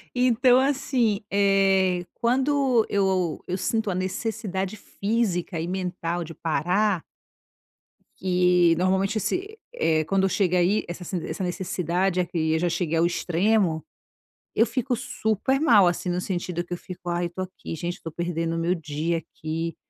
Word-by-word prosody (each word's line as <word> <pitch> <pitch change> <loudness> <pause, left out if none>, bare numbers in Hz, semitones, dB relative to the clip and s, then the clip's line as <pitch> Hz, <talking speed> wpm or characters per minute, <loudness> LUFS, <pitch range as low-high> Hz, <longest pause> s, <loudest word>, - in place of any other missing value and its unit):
Então, 250 0 +4
assim, 260 -6 +1
eh, 195 -2 +3
quando 260 -1 +2
eu 190 -4 +1
eu 180 +1 -1
sinto 220 +1 -1
a - - -2
necessidade 195 0 -3
física 200 -6 -1
e 165 - -3
mental 175 -2 -2
de 165 - -9
parar 180 +5 0 1.2
eh 180 -2 +4
normalmente 190 +3 +1
esse, 405 - -3
eh, 160 - +1
quando 195 +3 +2
chega 180 -1 +1
aí, 190 +5 +2
essa 175 +1 -6
sen 175 -1 -3
essa 190 - -4
necessidade, 180 0 -1
eh, 180 - +2
que 160 -2 -1
eu 160 - +1
já 175 0 +1
cheguei 165 -1 -1
ao 165 - +4
extremo, 175 0 +1 0.7
eu 225 - +5
fico 245 +2 -1
super 245 +1 -1
mal 215 - +6
assim, 175 +1 -1
no 175 0 0
sentido 175 -2 -3
que 175 - -7
eu - - -3
fico: 180 -1 -8
"Aí, 175 0 0
eu - - -11
tô 185 +2 -6
aqui, 185 -2 -6
gente, 175 +2 -4
eu - - -28
tô 165 - -5
perdendo 165 0 -2
o - - -1
meu 170 +2 +1
dia 160 +1 -2
aqui 165 +1 -5
185 Hz, 165 wpm, -25 LUFS, 175-210 Hz, 1.2 s, mal